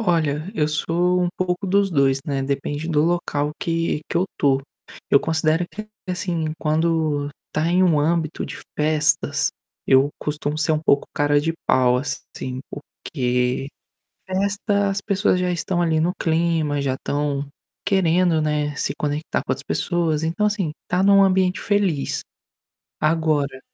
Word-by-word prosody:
Olha, 165 Hz, -4 st, 0 dB
eu 150 Hz, -7 st, +1 dB
sou 175 Hz, +4 st, +1 dB
um 175 Hz, -, +1 dB
pouco 185 Hz, +1 st, -1 dB
dos 200 Hz, +1 st, +2 dB
2, 135 Hz, -4 st, +3 dB
né, 140 Hz, -4 st, -1 dB
depende 145 Hz, +3 st, -3 dB
do 150 Hz, -3 st, +2 dB
local 155 Hz, -3 st, 0 dB
que 165 Hz, -2 st, -1 dB
que -, -, -2 dB
eu 175 Hz, -, +3 dB
tô. 135 Hz, -1 st, +2 dB, 0.5 s
Eu 140 Hz, -, +6 dB
considero 160 Hz, +1 st, +1 dB
que, 215 Hz, 0 st, -8 dB, 0.2 s
assim, 170 Hz, -3 st, -2 dB
quando 155 Hz, -2 st, +1 dB, 0.2 s
tá 155 Hz, +1 st, 0 dB
em 180 Hz, +2 st, +3 dB
um 170 Hz, -5 st, +4 dB
âmbito 160 Hz, +1 st, 0 dB
de -, -, -7 dB, 0.2 s
festas, 155 Hz, 0 st, +2 dB, 0.4 s
eu 135 Hz, +1 st, +5 dB
costumo 150 Hz, 0 st, -3 dB
ser 155 Hz, +1 st, +1 dB
um 155 Hz, -, +1 dB
pouco 140 Hz, -2 st, +2 dB
cara 145 Hz, 0 st, +3 dB
de 165 Hz, +2 st, -1 dB
pau, 125 Hz, -1 st, +4 dB
assim, 130 Hz, -1 st, -5 dB
porque 125 Hz, -2 st, -2 dB, 0.6 s
festa, 200 Hz, +1 st, 0 dB
as 195 Hz, -, -2 dB
pessoas 200 Hz, -2 st, +1 dB
já 180 Hz, -, 0 dB
estão 175 Hz, +1 st, -1 dB
ali 160 Hz, -2 st, +2 dB
no 170 Hz, +3 st, +1 dB
clima, 160 Hz, -3 st, +1 dB
já 135 Hz, -2 st, 0 dB
estão 145 Hz, +1 st, -2 dB, 0.4 s
querendo, 175 Hz, -3 st, +3 dB
né, 150 Hz, -1 st, 0 dB
se -, -, -1 dB
conectar 150 Hz, +1 st, -2 dB
com -, -, +1 dB
as 135 Hz, -, -3 dB
pessoas, 160 Hz, 0 st, 0 dB
então 170 Hz, +6 st, 0 dB
assim, 200 Hz, -7 st, -1 dB
estar 180 Hz, +1 st, 0 dB
num 200 Hz, 0 st, +6 dB
ambiente 185 Hz, -1 st, +2 dB
feliz. 200 Hz, -8 st, 0 dB, 0.8 s
Agora 155 Hz, -4 st, +1 dB
160 Hz, 150 wpm, -22 LUFS, 145-180 Hz, 0.8 s, Eu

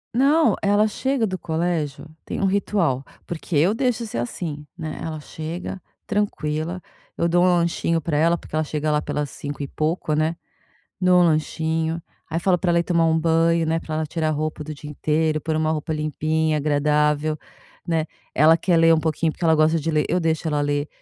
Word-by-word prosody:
Não, 290 Hz, +5 st, +4 dB
ela 205 Hz, +1 st, +3 dB
chega 260 Hz, +2 st, 0 dB
do 190 Hz, -3 st, -3 dB
colégio, 160 Hz, -3 st, -2 dB, 0.2 s
tem -, -, -5 dB
um 195 Hz, -, +1 dB
ritual, 190 Hz, -8 st, +1 dB, 0.2 s
porque 170 Hz, -1 st, -5 dB
eu 175 Hz, +8 st, +4 dB
deixo 240 Hz, -2 st, 0 dB
ser 115 Hz, -, -4 dB
assim, 150 Hz, +4 st, -4 dB
né? 160 Hz, -3 st, -5 dB
Ela 155 Hz, -1 st, -4 dB
chega 165 Hz, +5 st, -6 dB, 0.2 s
tranquila, 175 Hz, -5 st, -2 dB, 0.4 s
eu 170 Hz, -, +2 dB
dou 175 Hz, +1 st, +3 dB
um -, -, +5 dB
lanchinho 170 Hz, -1 st, +1 dB
pra 155 Hz, 0 st, -2 dB
ela, 165 Hz, +3 st, +3 dB
porque 155 Hz, -, -9 dB
ela 155 Hz, -, +2 dB
chega 150 Hz, 0 st, -2 dB
lá 150 Hz, -, +2 dB
pelas 150 Hz, -1 st, -3 dB
5 145 Hz, 0 st, -6 dB
e 140 Hz, -, -4 dB
pouco, 155 Hz, +1 st, -1 dB
né? 155 Hz, +2 st, +1 dB, 0.7 s
Dou 180 Hz, -1 st, +5 dB
um -, -, +6 dB
lanchinho. 160 Hz, +1 st, 0 dB, 0.3 s
Aí 165 Hz, -, 0 dB
falo 180 Hz, +1 st, +2 dB
pra 175 Hz, +1 st, 0 dB
ela 170 Hz, -, +3 dB
ir 170 Hz, -, +1 dB
tomar 170 Hz, -2 st, +2 dB
um 160 Hz, 0 st, +3 dB
banho, 165 Hz, 0 st, +2 dB
né? 165 Hz, +1 st, 0 dB
Pra 155 Hz, -, -5 dB
ela 155 Hz, 0 st, -1 dB
tirar 155 Hz, 0 st, -1 dB
roupa 155 Hz, 0 st, -2 dB
do 155 Hz, +1 st, -6 dB
dia 150 Hz, 0 st, -9 dB
inteiro, 155 Hz, +1 st, 0 dB
pôr 155 Hz, +1 st, -2 dB
uma 155 Hz, 0 st, +1 dB
roupa 155 Hz, +1 st, -3 dB
limpinha, 155 Hz, +1 st, 0 dB
agradável, 150 Hz, +1 st, +1 dB, 0.5 s
né? 165 Hz, -2 st, 0 dB, 0.3 s
Ela 155 Hz, +4 st, +6 dB
quer 170 Hz, +1 st, +1 dB
ler 165 Hz, 0 st, +6 dB
um 155 Hz, -, +1 dB
pouquinho 160 Hz, 0 st, 0 dB
porque 175 Hz, -, -6 dB
ela 160 Hz, -1 st, +5 dB
gosta 155 Hz, +1 st, +4 dB
de 165 Hz, -, -1 dB
ler, 150 Hz, -2 st, +2 dB
eu 180 Hz, -, +1 dB
deixo 160 Hz, 0 st, 0 dB
ela 150 Hz, -2 st, +1 dB
ler. 145 Hz, 0 st, 0 dB
160 Hz, 205 wpm, -23 LUFS, 155-170 Hz, 0.7 s, um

